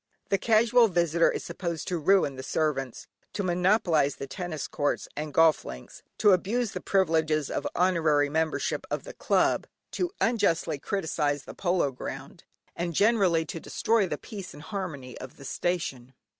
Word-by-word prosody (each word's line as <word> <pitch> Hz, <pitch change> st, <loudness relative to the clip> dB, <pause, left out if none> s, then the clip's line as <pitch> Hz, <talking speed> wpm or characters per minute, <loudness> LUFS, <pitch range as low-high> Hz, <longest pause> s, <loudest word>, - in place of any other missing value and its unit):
The 195 Hz, -, +2 dB
casual 230 Hz, +2 st, +4 dB
visitor 170 Hz, -3 st, +2 dB
is -, -, -3 dB
supposed 170 Hz, -4 st, -4 dB
to 175 Hz, -2 st, -1 dB
ruin 160 Hz, -4 st, +3 dB
the 130 Hz, -, -6 dB
servants, 135 Hz, -3 st, -2 dB, 0.3 s
to 200 Hz, -, -2 dB
monopolise 180 Hz, -5 st, +2 dB
the -, -, -6 dB
tennis 155 Hz, +3 st, -5 dB
courts, 145 Hz, -1 st, -1 dB
and 150 Hz, 0 st, -4 dB
golf 160 Hz, +1 st, +4 dB
links, 65 Hz, 0 st, -9 dB, 0.2 s
to 210 Hz, -, +5 dB
abuse 205 Hz, +5 st, +1 dB
the -, -, -5 dB
privileges 160 Hz, -6 st, +1 dB
of -, -, -2 dB
honorary 160 Hz, -5 st, +3 dB
membership 160 Hz, +2 st, -1 dB
of -, -, -3 dB
the -, -, -9 dB
club, -, -, +1 dB, 0.2 s
to 360 Hz, -, -1 dB
unjustly 175 Hz, -9 st, +1 dB
criticise 150 Hz, -6 st, -1 dB
the -, -, -10 dB
polo 175 Hz, -6 st, 0 dB
ground, 125 Hz, -, -8 dB, 0.3 s
and 170 Hz, -1 st, -3 dB
generally 195 Hz, -6 st, +3 dB
to 165 Hz, -, -6 dB
destroy 220 Hz, +4 st, +1 dB
the 150 Hz, -, -3 dB
peace 195 Hz, -4 st, -9 dB
and 145 Hz, -, -11 dB
harmony 160 Hz, -, -5 dB
of 130 Hz, -, -10 dB
the 140 Hz, -, -11 dB
station. 135 Hz, -7 st, -3 dB
170 Hz, 160 wpm, -27 LUFS, 150-195 Hz, 0.3 s, to